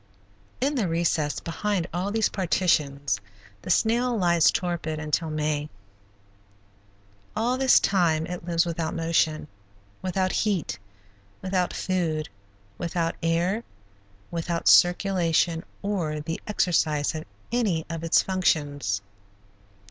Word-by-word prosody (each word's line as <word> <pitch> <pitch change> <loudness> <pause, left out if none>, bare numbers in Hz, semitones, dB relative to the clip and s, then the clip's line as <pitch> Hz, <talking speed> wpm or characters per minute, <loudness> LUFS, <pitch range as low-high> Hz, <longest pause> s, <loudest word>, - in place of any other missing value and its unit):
In 275 +3 +1
the 235 -9 0
recess 165 -3 0
behind 185 +2 -2
all 180 +3 -1
these 220 +1 +2
partitions 150 -7 +1 0.4
the - - -9
snail 235 +5 +2
lies 170 -4 +4
torpid 170 -4 -2
until 155 +1 -1
May. 150 -1 -1 1.7
All 235 +4 +1
this 260 -1 +5
time 165 -5 +2
it 180 0 -6
lives 170 -1 +1
without 165 -1 -3
motion, 165 -2 +1 0.5
without 185 0 0
heat, 170 - -1 0.6
without 185 -1 0
food, 165 -5 -1 0.5
without 170 -1 -1
air, 175 +7 +1 0.7
without 170 0 -2
circulation 175 -2 +4 0.2
or 175 -7 -1
the 165 +2 -4
exercise 160 -7 +1
of 155 0 -5 0.3
any 205 -10 0
of 165 -1 -5
its 165 - +4
functions. 145 - 0
170 Hz, 110 wpm, -26 LUFS, 160-190 Hz, 1.7 s, this